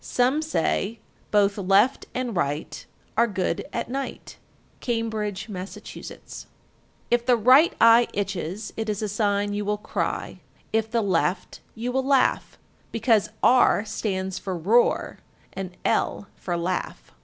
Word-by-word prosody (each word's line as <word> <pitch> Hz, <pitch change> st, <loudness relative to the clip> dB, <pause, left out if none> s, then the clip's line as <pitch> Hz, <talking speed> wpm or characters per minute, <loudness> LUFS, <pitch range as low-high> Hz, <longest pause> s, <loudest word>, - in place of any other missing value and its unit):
Some 255 Hz, +5 st, +1 dB
say, 230 Hz, -, -1 dB, 0.3 s
Both 205 Hz, -1 st, +2 dB
left 200 Hz, +7 st, +3 dB
and 250 Hz, -4 st, -2 dB
right 150 Hz, -3 st, -2 dB, 0.3 s
Are 235 Hz, +2 st, +4 dB
good 190 Hz, -4 st, -2 dB
at -, -, -3 dB
night. 270 Hz, +2 st, -6 dB, 0.4 s
Cambridge, 220 Hz, -4 st, -2 dB
Mass. 190 Hz, -2 st, -6 dB
1348. -, -, -10 dB, 0.6 s
If 240 Hz, 0 st, +2 dB
the 245 Hz, -2 st, +5 dB
right 255 Hz, +9 st, +6 dB
eye 230 Hz, +1 st, +7 dB
itches, 195 Hz, +1 st, -4 dB
it 220 Hz, -1 st, -3 dB
is 210 Hz, 0 st, -2 dB
a -, -, 0 dB
sign 205 Hz, 0 st, 0 dB
you 205 Hz, 0 st, -2 dB
will 210 Hz, +1 st, -1 dB
cry; 210 Hz, -, -3 dB, 0.3 s
if 220 Hz, 0 st, +1 dB
the 230 Hz, -1 st, 0 dB
left, 180 Hz, -1 st, -1 dB, 0.2 s
you 235 Hz, +3 st, -3 dB
will 265 Hz, +1 st, 0 dB
laugh, 270 Hz, -1 st, +1 dB, 0.3 s
because 225 Hz, -2 st, +2 dB
R 245 Hz, -4 st, +5 dB
stands 190 Hz, -3 st, -3 dB
for 190 Hz, -2 st, -4 dB
"roar" 215 Hz, +9 st, +2 dB, 0.3 s
and 185 Hz, -2 st, -6 dB
L -, -, 0 dB
for 175 Hz, -2 st, -3 dB
"laugh." 180 Hz, +2 st, -3 dB
210 Hz, 140 wpm, -25 LUFS, 195-235 Hz, 0.6 s, eye